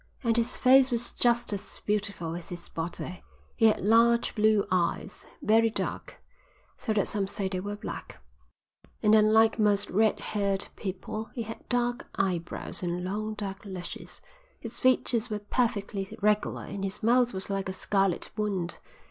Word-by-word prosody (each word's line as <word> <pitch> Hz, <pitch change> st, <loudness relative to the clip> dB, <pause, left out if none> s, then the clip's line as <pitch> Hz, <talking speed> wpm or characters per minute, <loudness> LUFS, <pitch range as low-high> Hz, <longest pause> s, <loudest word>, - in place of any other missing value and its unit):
"And 230 Hz, -2 st, +2 dB
his 235 Hz, +1 st, +1 dB
face 260 Hz, +1 st, +6 dB
was 240 Hz, -1 st, 0 dB
just 240 Hz, -2 st, +2 dB
as 200 Hz, -, -6 dB
beautiful 200 Hz, -6 st, -1 dB
as 170 Hz, -1 st, -7 dB
his 175 Hz, -1 st, -8 dB
body. 175 Hz, +2 st, -5 dB, 0.3 s
He 225 Hz, -, +5 dB
had 215 Hz, -, +2 dB
large 230 Hz, +3 st, +4 dB
blue 215 Hz, -2 st, +3 dB
eyes, 185 Hz, +2 st, -1 dB, 0.2 s
very 225 Hz, +1 st, +4 dB
dark, 220 Hz, -, -4 dB, 0.6 s
so 225 Hz, -, -3 dB
that 205 Hz, -, +1 dB
some 200 Hz, -2 st, -1 dB
say 200 Hz, 0 st, -2 dB
they 190 Hz, -1 st, -3 dB
were 205 Hz, +2 st, -4 dB
black, 205 Hz, -, -7 dB, 0.8 s
and 210 Hz, -, +5 dB
unlike 220 Hz, +1 st, +5 dB
most 205 Hz, -1 st, +2 dB
red 215 Hz, +3 st, +3 dB
haired 200 Hz, -2 st, -1 dB
people 205 Hz, +3 st, -5 dB
he 235 Hz, -, -2 dB
had 225 Hz, +1 st, -9 dB
dark 245 Hz, 0 st, 0 dB
eyebrows 180 Hz, 0 st, -1 dB
and 175 Hz, 0 st, -2 dB
long 215 Hz, +3 st, -3 dB
dark 195 Hz, -2 st, -5 dB
lashes. 190 Hz, -3 st, -7 dB, 0.4 s
His 230 Hz, 0 st, -6 dB
features 245 Hz, -2 st, +2 dB
were 210 Hz, -, -1 dB
perfectly 205 Hz, -3 st, -2 dB
regular 210 Hz, 0 st, +1 dB
and 195 Hz, -, -6 dB
his 195 Hz, +2 st, -4 dB
mouth 245 Hz, +2 st, +4 dB
was 190 Hz, +1 st, -5 dB
like 195 Hz, -1 st, -2 dB
a -, -, -1 dB
scarlet 195 Hz, -1 st, 0 dB
wound. 195 Hz, -5 st, -2 dB
210 Hz, 160 wpm, -28 LUFS, 195-225 Hz, 0.8 s, face